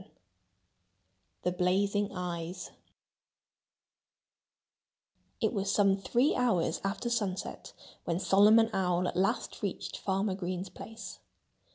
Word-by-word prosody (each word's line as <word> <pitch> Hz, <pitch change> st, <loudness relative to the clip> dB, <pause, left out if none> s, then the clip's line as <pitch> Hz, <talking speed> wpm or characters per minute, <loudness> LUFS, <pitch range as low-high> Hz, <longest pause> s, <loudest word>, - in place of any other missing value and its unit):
VII -, -, -18 dB, 1.3 s
The 180 Hz, -, +1 dB
Blazing 200 Hz, +3 st, +1 dB
Eyes 175 Hz, -1 st, -5 dB, 2.7 s
It -, -, +1 dB
was 195 Hz, -2 st, 0 dB
some 200 Hz, -2 st, +4 dB
three 240 Hz, +8 st, +2 dB
hours 185 Hz, -10 st, +1 dB
after 195 Hz, +5 st, -2 dB
sunset 205 Hz, -6 st, -3 dB, 0.3 s
when 170 Hz, 0 st, 0 dB
Solomon 210 Hz, +4 st, +5 dB
Owl 180 Hz, -1 st, +1 dB
at -, -, -3 dB
last 195 Hz, +6 st, 0 dB
reached 200 Hz, -3 st, -4 dB
Farmer 195 Hz, +1 st, 0 dB
Green's 185 Hz, 0 st, -4 dB
place. 225 Hz, +5 st, -9 dB
195 Hz, 100 wpm, -31 LUFS, 180-210 Hz, 2.7 s, Solomon